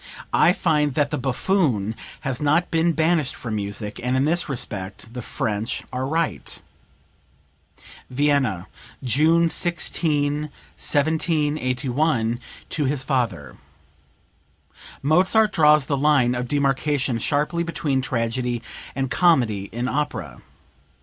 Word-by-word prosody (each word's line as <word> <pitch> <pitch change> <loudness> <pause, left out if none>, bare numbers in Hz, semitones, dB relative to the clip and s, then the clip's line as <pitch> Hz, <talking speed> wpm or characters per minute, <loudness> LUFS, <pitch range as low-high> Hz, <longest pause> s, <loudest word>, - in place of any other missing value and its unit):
I - - +5
find 150 -6 +1
that 145 -2 +1
the - - -1
buffoon 130 - 0 0.3
has 135 -1 -3
not 150 +4 +2
been 165 +1 +2
banished 160 -2 +1
from 115 -3 -5
music, 105 0 -4
and 125 +1 0
in 135 - +2
this 170 +1 +1
respect 105 -3 -5
the 125 - -5
French 110 -2 -3
are 130 +1 -2
right." 165 +2 -2 1.5
(Vienna, 130 -8 +1 0.4
June 160 +7 +3
16, 150 -4 0 0.3
1781, 145 -5 0 0.3
to 150 - -1
his 135 0 0
father. 115 - -2 1.5
Mozart 185 +8 +3
draws 150 -4 +5
the 140 - 0
line 135 -4 +3
of 125 0 -3
demarcation 140 -2 0
sharply 150 +7 0
between 155 -5 -1
tragedy 120 -1 -2 0.3
and 135 -1 -2
comedy 120 - +3
in 120 +4 -3
opera. 150 +4 -3
140 Hz, 110 wpm, -23 LUFS, 125-155 Hz, 1.5 s, I